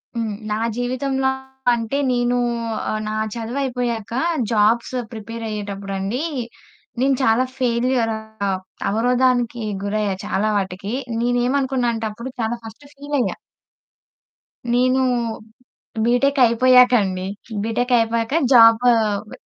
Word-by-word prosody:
హ్మ్. 225 Hz, -2 st, -2 dB, 0.2 s
నా -, -, +1 dB, 0.2 s
జీవితంలో 265 Hz, +2 st, 0 dB, 0.4 s
అంటే 235 Hz, +3 st, -2 dB
నేను 245 Hz, 0 st, +1 dB, 0.5 s
ఆహ్, 215 Hz, -, -2 dB
నా 215 Hz, -, -3 dB, 0.2 s
చదువుయిపోయాక 240 Hz, -2 st, -3 dB, 0.4 s
జాబ్స్ 225 Hz, +3 st, +2 dB, 0.2 s
ప్రిపేరయ్యేటప్పుడండి, 210 Hz, -1 st, -4 dB, 0.8 s
నేను 270 Hz, +1 st, +3 dB
చాలా 225 Hz, +1 st, +4 dB
ఫెయిల్యూర్ 245 Hz, -1 st, +1 dB, 0.8 s
అవరోధానికి 245 Hz, +1 st, +1 dB, 0.2 s
గురయ్యా 205 Hz, -1 st, -1 dB
చాలా 215 Hz, +3 st, 0 dB
వాటికి. 195 Hz, +2 st, -4 dB, 0.3 s
నేనేమనుకున్నా 250 Hz, +1 st, +1 dB
అంటే 225 Hz, -, -3 dB
అప్పుడు 235 Hz, +5 st, -7 dB
చాలా 225 Hz, +1 st, -1 dB
ఫస్ట్ 225 Hz, +6 st, -11 dB
ఫీలయ్యా. 280 Hz, -7 st, -2 dB, 1.4 s
నేను 255 Hz, +2 st, +3 dB, 1.0 s
బీటెక్ 275 Hz, +4 st, +2 dB
అయిపోయాకండి. 235 Hz, -6 st, +4 dB, 0.4 s
బీటెక్ 245 Hz, +3 st, 0 dB
అయిపోయాక 230 Hz, +3 st, 0 dB, 0.2 s
జాబు 230 Hz, -1 st, +7 dB, 0.5 s
వ -, -, -11 dB
235 Hz, 90 wpm, -21 LUFS, 220-255 Hz, 1.4 s, జాబు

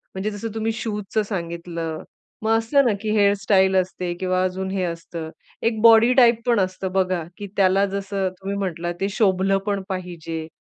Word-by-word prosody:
म्हणजे 205 Hz, +3 st, -2 dB
जसं 205 Hz, +1 st, -6 dB
तुम्ही 225 Hz, 0 st, 0 dB
शूजचं 215 Hz, -1 st, -2 dB
सांगितलं, 170 Hz, -4 st, -5 dB, 0.4 s
मग 225 Hz, +1 st, +2 dB
असं 275 Hz, +5 st, +2 dB
ना 230 Hz, -, +3 dB
की 215 Hz, -, -2 dB
हेअर 200 Hz, 0 st, +5 dB
स्टाईल 190 Hz, -2 st, +3 dB
असते 180 Hz, -1 st, -1 dB
किंवा 185 Hz, 0 st, +1 dB
अजून 190 Hz, +1 st, -2 dB
हे 195 Hz, -1 st, -1 dB
असतं. 170 Hz, -1 st, -5 dB, 0.3 s
एक 225 Hz, -1 st, +1 dB
बॉडी 230 Hz, +1 st, +7 dB
टाइप 240 Hz, -3 st, +5 dB
पण 235 Hz, -4 st, +3 dB
असतं 185 Hz, 0 st, -2 dB
बघा 185 Hz, -3 st, +1 dB
की 205 Hz, -, -6 dB
त्याला 195 Hz, +1 st, +4 dB
जसं 195 Hz, -1 st, -2 dB
तुम्ही 195 Hz, +1 st, -4 dB
म्हटलात, 175 Hz, -3 st, -3 dB
ते 195 Hz, -, +1 dB
शोभलं 195 Hz, -1 st, +2 dB
पण 200 Hz, -1 st, 0 dB
पाहिजे. 170 Hz, -4 st, -5 dB
195 Hz, 175 wpm, -22 LUFS, 185-215 Hz, 0.4 s, बॉडी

